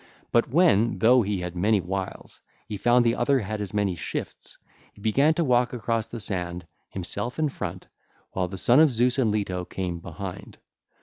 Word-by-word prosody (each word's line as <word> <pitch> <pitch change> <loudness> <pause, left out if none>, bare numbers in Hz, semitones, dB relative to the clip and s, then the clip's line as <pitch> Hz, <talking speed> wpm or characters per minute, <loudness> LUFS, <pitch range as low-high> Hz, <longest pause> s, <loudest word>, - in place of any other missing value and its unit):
But 120 - +2
when, 125 - +3
though 125 +2 +5
he 100 -3 -2
had 90 0 -5
many 105 +4 +2
wiles, 95 +1 -5 0.3
he 105 - -4
found 120 +4 +3
the 115 - +3
other 135 +3 +2
had 105 -2 -3
as 100 -3 -4
many 100 -2 0
shifts, 85 - -6 0.4
he - - -19
began 140 +9 +3
to 170 - +1
walk 125 -3 +2
across 115 -2 -1
the 115 - -7
sand, 90 -4 -3 0.2
himself 100 +6 -5
in 155 -1 +1
front, - - -6 0.5
while 95 -1 -1
the 95 +1 -7
Son 120 - +4
of 155 -2 +6
Zeus 125 +3 +1
and 120 -4 +3
Leto 100 -4 -1
came 90 -1 -4
behind. 90 +3 -8
110 Hz, 185 wpm, -25 LUFS, 95-120 Hz, 0.5 s, of